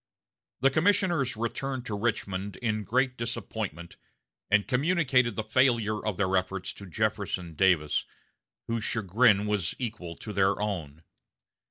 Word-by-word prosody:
The 135 +1 +5
commissioners 165 - +2
returned 130 +3 -3
to 105 - -3
Richmond 100 -3 -2
in 110 -2 -1
great 130 +5 +1
disappointment, 110 -7 -4 0.5
and 105 0 +3
communicated 130 -3 +2
the 110 - -2
failure 115 -2 +2
of 105 -4 -2
their 95 -1 +1
efforts 95 0 -1
to 100 - -11
Jefferson 100 -3 -2
Davis, 80 -3 +2 0.6
whose 115 -1 -2
chagrin 105 -1 +3
was 105 -5 -1
equal 105 -9 -5
to 105 - -7
their 100 0 +2
own. 85 -8 -4
105 Hz, 130 wpm, -28 LUFS, 95-125 Hz, 0.6 s, The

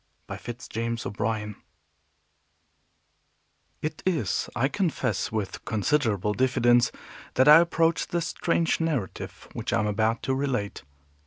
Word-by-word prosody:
BY - - -6
FITZ 120 0 -8
JAMES 115 +1 -3
O'BRIEN 105 0 -2 2.3
It 155 0 -3
is, 180 -5 0
I 130 - +2
confess, 155 - -1
with 105 -3 -3
considerable 110 -3 +1
diffidence, 120 -1 +3 0.4
that 130 - +4
I 150 +2 +10
approach 165 -1 +2
the 175 - -1
strange 170 -1 0
narrative 150 - -3
which - - -4
I - - +2
am 105 - +1
about 110 +2 0
to 135 - 0
relate. 130 -7 -2
120 Hz, 120 wpm, -26 LUFS, 110-155 Hz, 2.3 s, I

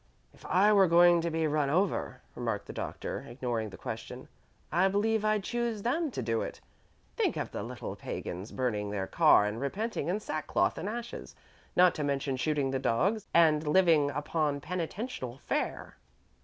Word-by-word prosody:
"If - - -20
I 205 +3 +4
were 195 -2 +6
going 175 0 +6
to 170 - -1
be 160 0 0
run 150 -2 +1
over," 185 +5 0
remarked 115 -4 -3
the - - -8
Doctor, - - -5
ignoring 120 -3 -3
the - - -11
question, - - -7 0.4
"I 180 +4 +4
believe 215 +2 +1
I'd 215 -1 +1
choose 235 -2 -2
them 305 +7 0
to 180 - -4
do 115 0 0
it. - - -5 0.6
Think - - 0
of - - -3
the - - -4
little - - -6
pagans 95 +5 -6
burning 105 -5 -1
their 100 -2 -2
car 105 - +5
and 105 +3 -3
repenting 210 +12 -2
in 185 +4 0
sackcloth 155 -7 -1
and 200 - -3
ashes, 235 +1 -6 0.4
not 180 -1 +6
to 150 - -3
mention 140 -1 -1
shooting 140 0 0
the 135 - -1
dogs 190 - 0
and 155 -2 +4
living 160 -3 +4
upon 145 +1 -1
penitential 165 - -4
fare." - - -3
155 Hz, 170 wpm, -30 LUFS, 130-195 Hz, 0.6 s, were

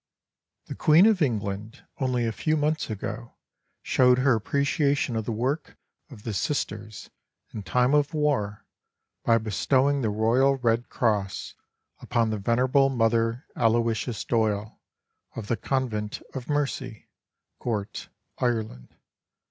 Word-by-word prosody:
The - - -6
Queen 160 +5 +5
of 215 -5 +3
England 105 -2 -2
only 125 -3 0
a 115 - 0
few 155 +7 0
months 155 -1 0
ago 110 +2 -6 0.5
showed 125 -1 +4
her 130 0 +3
appreciation 140 +3 0
of 110 -1 -2
the - - -2
work 130 +8 -2 0.3
of 115 -7 -13
the 115 - -4
Sisters 105 - -3 0.4
in 110 - -5
time 125 +6 +1
of 145 0 +3
war 140 -10 -1 0.6
by 115 - +4
bestowing 130 +6 +1
the 110 - 0
Royal 115 +6 +3
Red 120 -1 0
Cross 105 -5 -1 0.5
upon 115 -2 0
the 110 - -2
venerable 130 +6 +3
Mother 115 0 +1
Aloysius 115 0 0
Doyle, 110 -2 -1 0.5
of 115 - -5
the 120 - +2
Convent 110 -4 -2
of 130 -1 -7
Mercy, 135 -5 -2 0.5
Gort, 105 -3 -4 0.3
Ireland. 110 - -2
120 Hz, 125 wpm, -26 LUFS, 110-135 Hz, 0.6 s, Queen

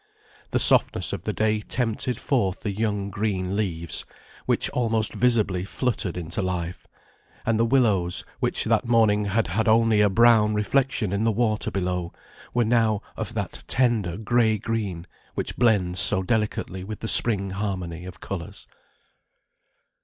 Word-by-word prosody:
The - - 0
softness 90 - +4
of 100 -2 -6
the 105 - -1
day 110 0 0
tempted 120 +2 -2
forth 110 -8 -1
the 105 - -3
young 100 -1 -2
green 100 -2 -2
leaves, 85 -6 -2 0.4
which - - +1
almost 115 -3 0
visibly 110 -7 +1
fluttered 100 -4 -2
into 85 +2 -3
life; 90 -2 -4 0.6
and 115 -1 +1
the 115 - +3
willows, 105 -9 +1
which - - 0
that 125 - +1
morning 110 -3 +3
had 100 0 0
had 105 +4 -1
only 110 -1 +4
a 105 - +4
brown 110 0 +4
reflection 115 -1 0
in 100 +2 0
the 115 - +2
water 110 -1 0
below, 90 -2 -3 0.4
were 120 -1 +1
now 110 -2 +1
of - - -6
that - - -5
tender 115 -9 +1
gray 110 0 +1
green 100 -6 -4 0.3
which - - -3
blends 100 -7 +2
so 95 -2 +4
delicately 105 -3 -2
with 105 +1 -8
the 115 - -4
spring 100 -5 +4
harmony 90 -4 -4
of 85 -3 -10
colours. 85 -3 -7
105 Hz, 150 wpm, -24 LUFS, 95-115 Hz, 0.6 s, softness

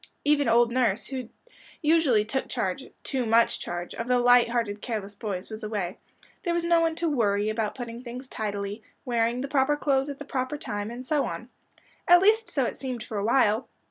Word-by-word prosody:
Even 290 -3 +3
old 235 +1 +4
nurse, 235 -5 +1
who 255 -3 -5 0.5
usually 300 -9 +4
took 265 +5 -3
charge - - -2 0.2
too 265 -3 -1
much 230 0 +3
charge 175 0 -5
of 230 - -5
the 250 0 +3
light 245 -1 +5
hearted 230 -4 -1
careless 210 -4 -4
boys, 200 -1 -5
was 215 0 -6
away; 205 -4 -3 0.4
there 345 -2 -1
was 345 - 0
no 340 0 +4
one 325 -1 +1
to 335 +1 -1
"worry" 210 -7 +1
about 215 -1 -2
putting 240 -2 -6
things 250 +1 -8
by - - -13
tidily, 205 0 -3 0.2
wearing 235 0 +1
the 275 - -3
proper 280 +1 +2
clothes 275 -1 +1
at 280 - -5
the 290 - -8
proper 260 +1 -2
time, 205 -6 -4
and 245 +2 -7
so 295 +2 +1
on. - - -6 0.6
At 350 +1 +7
least 440 +2 +4
so 270 -3 +1
it - - -4
seemed 255 -4 -4
for 215 -2 -4
a - - -2
while. 225 0 +2
240 Hz, 205 wpm, -27 LUFS, 215-275 Hz, 0.6 s, At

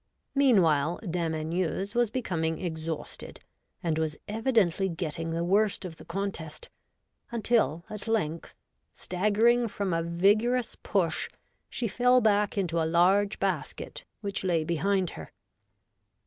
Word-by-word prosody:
Meanwhile, 175 - +3
Dame 170 -2 -1
Anieuse 175 +5 -2
was 240 -2 +2
becoming 165 -9 -2
exhausted, 160 -2 -5 0.4
and 160 -2 0
was 155 -1 -1
evidently 210 -5 +1
getting 165 -1 -3
the 165 +1 -1
worst 200 +2 +2
of 165 -3 -7
the - - -13
contest, 170 -4 -5 0.6
until 215 - +1
at 210 +1 -7
length, 170 -8 -1 0.4
staggering 215 +6 +2
from 200 -3 -2
a 165 - +1
vigorous 210 +8 +2
push, 175 -5 0 0.4
she 240 - -2
fell 250 +4 +4
back 210 -3 +2
into 170 -4 0
a - - +1
large 195 +4 +3
basket - - -3 0.2
which 200 -2 -3
lay 170 -4 +1
behind 180 +3 0
her. - - -9
185 Hz, 125 wpm, -28 LUFS, 165-215 Hz, 0.6 s, fell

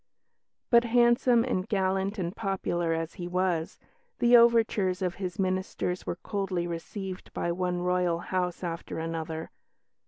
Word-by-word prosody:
But 235 0 +7
handsome 240 0 +4
and 200 -7 -2
gallant 190 +1 0
and 180 0 -3
popular 175 -4 -1
as 165 0 -2
he 175 - -3
was, 180 -2 -1 0.4
the 245 0 +5
overtures 225 -6 +4
of 180 -1 0
his 180 0 -3
ministers 185 -1 -2
were - - -1
coldly 190 -2 -2
received 185 +3 -6
by 170 - -1
one 180 0 -1
Royal 180 -1 +1
house 180 0 -2
after 170 -1 -4
another. 160 0 -4
185 Hz, 135 wpm, -28 LUFS, 175-200 Hz, 0.4 s, But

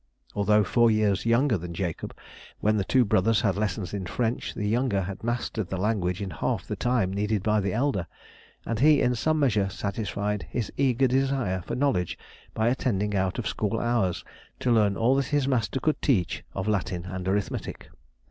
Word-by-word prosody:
Although 105 +1 +3
four 115 +4 +3
years 110 -1 +1
younger 115 -2 +3
than 85 0 -7
Jacob, 90 -3 -4 0.4
when 110 +1 +2
the 100 - +1
two 125 +4 +3
brothers 105 +2 +3
had 100 -4 +1
lessons 100 -2 -2
in 95 -3 -3
French, 120 +3 -2
the 105 - -2
younger 115 -2 +1
had 95 +3 -7
mastered 115 -4 -2
the 95 - -2
language 95 -2 0
in 95 - -5
half - - -2
the - - -4
time 120 -7 0
needed 105 0 0
by 105 0 +2
the 100 -1 -1
elder, 110 - 0 0.6
and 115 -2 -2
he 150 +2 +6
in 125 - +2
some 155 +7 +1
measure 105 -9 +2
satisfied 100 +1 -3
his 120 -4 -3
eager 135 -1 +2
desire 130 -7 +1
for - - -5
knowledge 115 -11 0 0.4
by 110 +1 +1
attending 105 -5 0
out 95 -1 0
of - - -3
school 110 +1 -1
hours 120 -7 0 0.3
to 125 - +1
learn 105 -4 +3
all 120 +3 +3
that 135 -1 +1
his 145 -2 +1
master 130 -1 0
could 155 +4 0
teach 100 - +1
of 95 +1 -3
Latin 95 -4 -1
and 95 0 -5
arithmetic. 100 0 -2
105 Hz, 185 wpm, -26 LUFS, 95-120 Hz, 0.6 s, he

